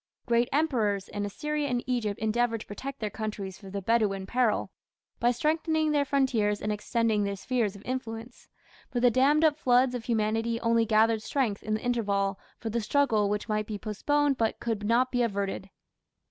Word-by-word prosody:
Great 235 0 +2
emperors 230 -10 +1
in 205 0 -3
Assyria 300 +7 -2
and 245 -2 -1
Egypt 235 -5 -1
endeavoured 225 +1 0
to - - -9
protect 270 +6 -7
their 215 -2 -3
countries 200 -3 -5
from 195 - -11
the 200 0 -5
"Bedouin 205 -3 +1
peril" 240 +1 +1 0.5
by 240 - +3
strengthening 310 +4 +1
their 290 -1 +2
frontiers 250 -7 +1
and 210 - -2
extending 215 0 0
their 200 0 -1
spheres 220 -1 -1
of 200 - -12
influence, 235 -2 -6 0.4
but 240 -1 -2
the 245 - +6
dammed 280 +6 +4
up 305 -1 +3
floods 250 0 +3
of 240 -2 -5
humanity 225 0 0
only 230 -1 +2
gathered 220 0 +3
strength 225 -4 -1
in 215 0 -1
the 215 - -5
interval 200 -5 0 0.2
for 225 - -5
the 235 +1 0
struggle 220 -4 +2
which 210 0 -2
might 215 -1 -1
be 215 - -4
postponed 280 +7 0
but 225 -1 0
could 225 -3 -2
not 235 +4 +2
be 245 - +1
averted. 200 -3 -2
230 Hz, 185 wpm, -28 LUFS, 210-255 Hz, 0.5 s, the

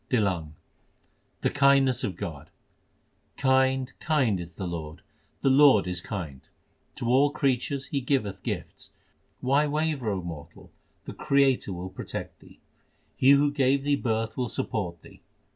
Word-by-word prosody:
TlLANG 115 -5 +2 0.2
l 75 0 -14 0.9
The - - +1
kindness 140 -3 +3
of 95 - -2
God: 75 -2 -7 0.9
Kind, 130 0 +2
kind 130 - +1
is 85 -1 -9
the 95 - -5
Lord; 80 -3 -6 0.4
My 135 - +4
Lord 135 -7 +6
is 90 -1 -1
kind: 85 -11 -6 0.5
To - - -5
all 135 +4 +4
creatures 135 -1 -1
He 140 - -2
giveth 125 -8 -1
gifts. - - -6 0.5
Why 140 +4 +2
waver, 150 -5 -1
O 95 -3 -2
mortal? 80 -2 -10 0.3
the - - -7
Creator 140 -7 +2
will 90 +1 -6
protect - - -7
thee. - - -18 0.6
He 130 - +3
who 140 +1 +5
gave 135 -1 +2
thee 145 0 +2
birth 110 -4 -2
will 125 -2 -2
support 85 -8 -4
thee. - - -16
125 Hz, 145 wpm, -27 LUFS, 90-140 Hz, 0.9 s, Lord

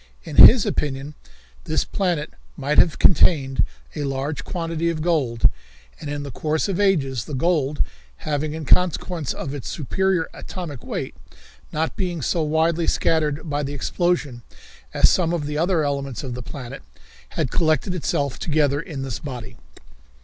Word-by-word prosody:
In - - -7
his 235 -3 +10
opinion, 140 0 -2 0.5
this - - 0
planet 175 -6 -1 0.2
might 145 +2 +2
have 165 - +4
contained 140 -5 +4 0.3
a 145 - -2
large 140 +1 -2
quantity 165 -1 -2
of 155 -2 -2
gold, 140 -9 +2 0.5
and 145 - -6
in 145 0 -3
the 140 - -6
course 155 - -1
of 195 -1 -2
ages 140 - +1
the 145 - -5
gold, 150 -1 +1 0.4
having, 150 0 -1
in 160 -1 -5
consequence 175 -3 +2
of 140 - -5
its 140 -4 -5
superior 180 +3 0
atomic 160 -9 -7
weight, - - -4 0.6
not 160 +1 -1
being 175 -5 -2
so 165 +8 +1
widely 160 +2 +1
scattered 155 -1 +1
by 145 -1 -1
the 145 0 -4
explosion 150 -5 -1 0.5
as - - +5
some 170 -2 +2
of 160 -4 -1
the 150 +1 -2
other 170 -1 +2
elements 140 -4 -2
of 130 -3 -5
the 125 - -5
planet, 125 +1 -8 0.6
had - - 0
collected 155 +2 +1
itself 145 -5 -1
together 150 -2 +1
in 145 -5 -6
this 130 -5 -4
body. 125 -6 -7
150 Hz, 155 wpm, -23 LUFS, 140-170 Hz, 0.6 s, his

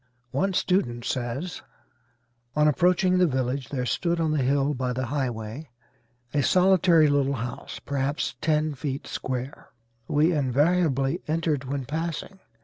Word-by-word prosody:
One 190 +8 0
student 125 -12 0
says; 130 +8 -3 0.9
"On 150 0 +4
approaching 180 +4 +3
the 180 - +5
village 130 -2 -2
there 130 -3 -2
stood 170 +6 0
on 160 -1 +1
the 155 -2 +1
hill 140 +2 +2
by 130 -2 -2
the 130 +1 -2
highway 125 0 -4 0.6
a 145 - +2
solitary 180 -1 +5
little 140 -1 +2
house, 120 0 -6
perhaps 140 -2 -2
ten 155 -1 +1
feet 140 0 -4
square, 130 +1 -5 0.4
we 155 +4 +3
invariably 145 +2 +1
entered 155 -3 0
when 135 0 -3
passing. 165 +6 -4
145 Hz, 135 wpm, -26 LUFS, 130-165 Hz, 0.9 s, the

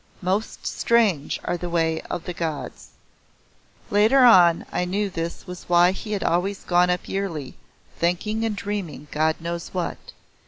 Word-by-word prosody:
Most 195 +4 -2
strange 210 -11 +1
are 175 - -1
the 175 0 -5
way 165 -1 0
of 170 - -4
the 180 - -5
Gods'. 160 -3 -5 1.0
Later 215 +6 +5
on 175 -7 +6
I - - 0
knew 195 +3 -1
this 165 -1 -5
was 180 -1 -10
why 175 +1 +5
he 210 +3 -6
had 200 - -2
always 190 +3 0
gone 180 0 +3
up 180 0 -1
yearly, 170 -9 -4 0.5
thinking 200 +6 0
and 225 -2 -1
dreaming 195 -8 -5
God 155 +1 +1
knows 170 +1 -5
what. 180 -2 -2
180 Hz, 155 wpm, -23 LUFS, 170-200 Hz, 1.0 s, on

